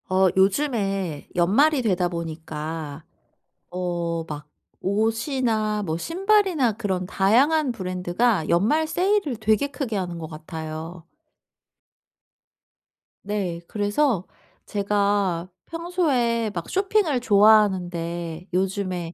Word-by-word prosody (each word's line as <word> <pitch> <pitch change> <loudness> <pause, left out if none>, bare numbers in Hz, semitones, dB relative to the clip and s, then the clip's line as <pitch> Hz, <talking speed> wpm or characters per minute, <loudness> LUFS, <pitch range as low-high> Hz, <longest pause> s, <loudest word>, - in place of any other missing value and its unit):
어 190 0 +4
요즘에 195 - 0
연말이 260 - +3
되다 185 -6 +1
보니까 160 -2 -6 0.7
어 170 -2 -2
막 150 -1 -7 0.3
옷이나 220 +1 0
뭐 160 -4 -2
신발이나 365 - +2
그런 195 -4 -2
다양한 260 +11 +3
브랜드가 185 -1 0
연말 230 - +2
세일을 365 - +1
되게 220 +4 +2
크게 265 -5 -4
하는 175 -3 -3
것 160 - -6
같아요. 160 +1 -7 2.2
네. 195 -5 -3
그래서 205 - 0 0.4
제가 200 -3 0 0.2
평소에 290 -10 0
막 170 - -4
쇼핑을 385 -7 +2
좋아하는데 180 -6 +2
요즘에 185 -2 -1
200 Hz, 210 characters per minute, -24 LUFS, 175-245 Hz, 2.2 s, 어